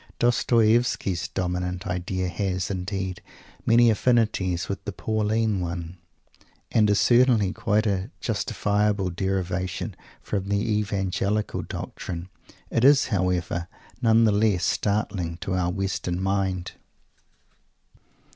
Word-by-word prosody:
Dostoievsky's 115 -5 +2
dominant 90 -1 -3
idea 90 +1 -2
has, 95 0 -2
indeed, 95 0 -3 0.5
many 115 0 +6
affinities 105 -6 +1
with 100 -1 -4
the 100 - -4
Pauline 110 0 0
one, 85 0 -5 0.7
and 105 -2 +4
is 100 - +3
certainly 120 -5 +4
a - - -5
quite 105 -3 0
justifiable 105 -2 0
derivation 95 -1 -2 0.2
from 100 -1 -3
the 100 0 +2 0.2
Evangelical 100 +1 -1
doctrine. 85 +1 -6 0.4
It 115 - +1
is, 140 0 +6
however, 90 -4 0 0.3
none 115 -1 +5
the 110 - +4
less 100 -4 +2
startling 100 -5 -1
to 95 - -2
our 90 -1 +1
Western 95 -1 -2
mind. 95 -2 -1
95 Hz, 110 wpm, -25 LUFS, 90-110 Hz, 0.7 s, many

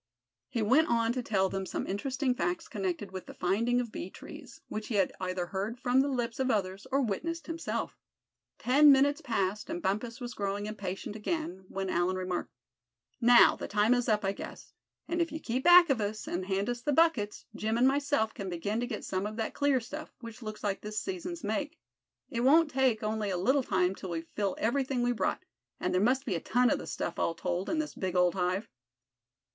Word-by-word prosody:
He 230 -3 -1
went 275 +9 +4
on 230 0 +2
to 255 - -2
tell 195 -5 +1
them 190 0 -4
some - - -3
interesting 255 +6 -1
facts 175 -5 -2
connected 190 -1 -3
with 185 -1 -7
the - - -10
finding 230 +7 +1
of 240 -3 -3
bee 185 - -5
trees, - - -11
which 215 0 -5
he 225 - -2
had 195 -2 +2
either 185 -1 -2
heard 200 +6 -4
from 255 +1 +3
the 275 - +1
lips 245 -4 -2
of 260 0 +1
others, 195 0 -1
or 275 +1 +2
witnessed 330 - -3
himself. 330 0 -4 0.6
Ten 285 +4 +6
minutes 280 +1 +4
passed, 210 -2 -1
and 335 +2 -3
Bumpus 230 - -2
was 240 -1 -5
growing 200 0 -2
impatient 205 -1 -5
again, 215 - -3
when 195 0 -3
Allan 180 +1 +1
remarked: 185 -1 -3 0.7
"Now, 240 0 +7
the - - -6
time 210 +3 +3
is 245 -1 0
up, 210 -2 +2
I 195 - +2
guess; 200 - -9 0.3
and 345 0 0
if 335 - 0
you 315 - -4
keep 255 -2 -2
back 350 -2 +8
of 240 -5 +1
us, 210 +1 -3
and 185 +1 -3
hand 195 +1 0
us 245 0 -2
the 295 - 0
buckets, 275 -10 +2
Jim 220 +2 -1
and 250 +2 +5
myself 280 -5 +1
can 195 -2 -5
begin 200 +6 -2
to 245 - -2
get 220 -5 -5
some 190 +2 -2
of 215 - -6
that 225 -1 -3
clear 285 -2 +2
stuff, 270 +6 -8
which 230 0 -10
looks 215 -1 -7
like 200 -2 -1
this 210 0 -6
season's 355 -1 -5
make. 290 +8 -2 0.5
It 235 - -2
won't 300 +5 +5
take 255 -5 +2
only 215 -1 -1
a 185 - -1
little 260 +10 +3
time 185 -6 +1
till 190 -1 -8
we 165 -1 -2
fill 195 +3 -3
everything 255 +2 0
we 245 - +2
brought, 240 - -1 0.3
and - - -1
there 185 - +3
must 260 +5 +2
be 220 - -1
a 170 - -1
ton 245 +7 +2
of - - +1
the - - -8
stuff, - - -3
all 165 - 0
told, 180 +1 -2
in 325 - 0
this 310 -1 -2
big 185 -1 -3
old 180 -1 +4
hive." 185 +3 -1
220 Hz, 215 wpm, -30 LUFS, 195-265 Hz, 0.7 s, back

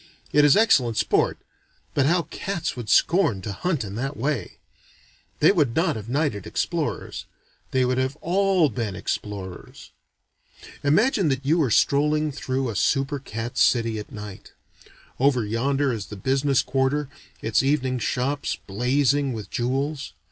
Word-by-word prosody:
It 150 - +5
is 145 +3 +6
excellent 130 - +3
sport - - +1 0.6
but 140 -1 +2
how 170 +2 +2
cats 180 -6 -3
would 120 -4 -7
scorn 170 - +3
to 105 - -4
hunt 160 - -1
in 100 -2 -7
that 135 +4 -3
way! 130 -6 -2 0.8
They 155 - +7
would 145 - +1
not 165 -1 +2
have 110 0 -7
knighted 135 - -1
explorers - - -3 0.4
they 130 -1 +2
would 125 +1 0
have 130 +2 -1
all 185 -1 +2
been 110 -4 -3
explorers. 95 -4 -6 0.9
Imagine 190 - +3
that 135 0 -2
you 160 +4 +3
are 135 - +1
strolling 150 +5 +2
through 130 -1 -2
a - - -8
super 135 +7 +1
cat 115 -2 -5
city 115 -3 +2
at 105 - -9
night. 105 -2 -9 0.7
Over 130 -4 +3
yonder 135 +5 0
is 105 -3 -5
the 105 - -8
business 135 +3 +1
quarter, 135 +2 0 0.4
its 110 - +2
evening 130 -2 0
shops 135 +5 -1
blazing 135 +5 +1
with 110 -3 -7
jewels. 135 +4 -2
135 Hz, 150 wpm, -24 LUFS, 115-150 Hz, 0.9 s, They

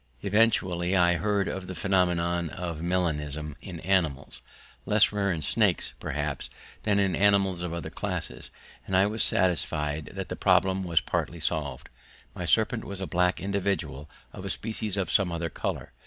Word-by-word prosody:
Eventually 95 -4 +2
I 85 -2 +5
heard 100 +2 0
of 95 -1 -4
the 95 - -6
phenomenon 85 -2 +1
of 85 -3 -5
melanism 75 -4 -1
in 90 -4 -8
animals, 80 -8 0 0.5
less 105 0 +4
rare 100 -2 0
in 80 -3 -3
snakes - - +1
perhaps 75 -1 -3 0.3
than 105 -2 +1
in 95 -3 +2
animals 100 -3 +3
of 90 -2 -3
other 85 -1 -5
classes, - - -4 0.4
and 95 - +2
I 95 - +5
was 110 +2 -1
satisfied 80 -5 +2
that - - -5
the - - -3
problem 95 0 +2
was 85 -2 +3
partly 85 - -2
solved. 75 -5 -2 0.5
My 90 - -5
serpent 110 +7 +2
was 100 -1 -6
a 95 - -3
black 90 0 +1
individual 100 -7 -2 0.2
of - - -8
a - - -4
species 110 -2 -1
of 95 -4 -1
some 95 -3 +3
other 85 -1 -3
colour. - - -4
90 Hz, 165 wpm, -27 LUFS, 80-100 Hz, 0.5 s, I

